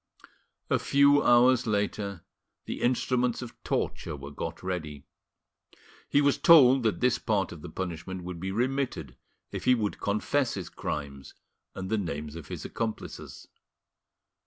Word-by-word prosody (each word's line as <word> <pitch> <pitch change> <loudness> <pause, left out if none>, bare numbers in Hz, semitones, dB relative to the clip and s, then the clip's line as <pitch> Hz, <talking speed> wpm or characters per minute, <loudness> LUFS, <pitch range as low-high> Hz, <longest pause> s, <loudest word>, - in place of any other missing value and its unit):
A - - +3
few 140 +1 +4
hours 120 0 +5
later 100 -3 -2 0.4
the - - -5
instruments 125 0 +1
of 120 - -9
torture 80 - -2
were 70 0 -9
got 80 +4 -6
ready. 80 -6 -4 1.0
He 145 - +4
was 140 -1 +2
told 135 -5 +7
that 110 -2 0
this 125 -1 +2
part 100 -5 0
of 85 - -9
his - - -9
punishment 90 0 -5
would 90 -1 -6
be 95 +2 -3
remitted 130 +5 -2 0.4
if - - -5
he 125 0 +6
would 105 -3 -2
confess 120 +6 0
his 95 -5 -5
crimes 70 -2 -6 0.4
and 95 +1 -5
the 110 - +2
names 75 -4 -4
of 85 -4 -9
his - - -6
accomplices. 115 -2 -5
105 Hz, 145 wpm, -28 LUFS, 85-125 Hz, 1.0 s, told